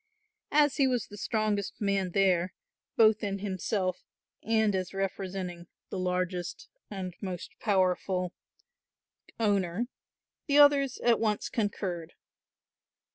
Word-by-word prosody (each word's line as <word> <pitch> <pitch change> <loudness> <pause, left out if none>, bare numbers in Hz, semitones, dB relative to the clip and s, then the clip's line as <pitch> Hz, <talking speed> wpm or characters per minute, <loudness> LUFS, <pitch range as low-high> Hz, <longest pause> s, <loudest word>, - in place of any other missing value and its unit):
As 295 0 +4
he 275 -2 +4
was 250 -4 0
the 205 - -11
strongest 210 -1 -1
man 200 -2 +1
there, 185 -2 +2 0.4
both 220 0 +5
in 200 -1 -1
himself 190 -1 -2 0.4
and 220 -2 +2
as 185 0 -2
representing 185 -2 -3 0.2
the 190 - -3
largest 180 -1 -2 0.2
and 190 -3 -5
most 185 -3 -5
powerful 185 -2 +1 1.1
owner, 200 -1 +1 0.6
the 285 -1 +3
others 285 -3 +6
at 235 -2 +4
once 215 -2 0
concurred. 195 -7 -2
195 Hz, 110 wpm, -29 LUFS, 185-220 Hz, 1.1 s, others